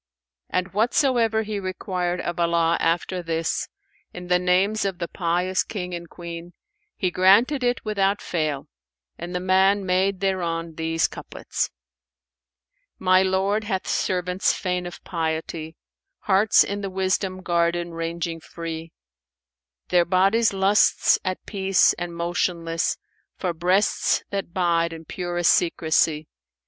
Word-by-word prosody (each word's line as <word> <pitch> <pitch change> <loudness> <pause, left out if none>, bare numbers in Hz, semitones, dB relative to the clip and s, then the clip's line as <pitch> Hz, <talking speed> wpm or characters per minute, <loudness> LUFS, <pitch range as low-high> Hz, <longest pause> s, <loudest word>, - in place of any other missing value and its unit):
And 185 0 -2
whatsoever 230 0 +2
he 210 -1 -4
required 185 -1 -3
of 175 0 -4
Allah 170 -1 +2
after 175 +2 0
this, 165 -1 -2 0.4
in 180 0 -9
the 180 0 +4
names 185 +4 +2
of 195 -3 -2
the 170 -1 -3
pious 180 +2 0
King 180 -4 -5
and 170 -1 -6
Queen, 170 0 -8 0.4
He 185 -2 0
granted 210 +10 +4
it 245 -1 0
without 200 -1 +1
fail 155 -5 -2 0.5
and 175 +1 -6
the - - 0
man 190 +2 +3
made 185 +1 +1
thereon 170 -4 -1
these 165 0 0
couplets, - - -4 1.3
"My 185 0 +4
Lord 190 +3 +1
hath 190 -3 -2
servants 180 +1 0
fain 180 -2 -2
of 175 - -10
piety; 160 -1 -3 0.2
* - - -59
Hearts 205 +2 +4
in 200 0 -4
the 195 - -3
Wisdom 185 0 -1
garden 170 0 0
ranging 165 0 -3
free: 165 0 -7 1.0
Their 175 -1 +4
bodies' 195 +6 +3
lusts 195 +1 +3
at 185 -1 -4
peace, 195 -2 +3
and 175 -1 -6
motionless 170 -1 -1 0.2
* - - -45
For 180 -3 -2
breasts 180 +5 +1
that 195 -3 -3
bide 170 -2 +1
in 165 0 -10
purest 175 0 +1
secresy. 160 -2 +1
180 Hz, 135 wpm, -24 LUFS, 170-195 Hz, 1.3 s, the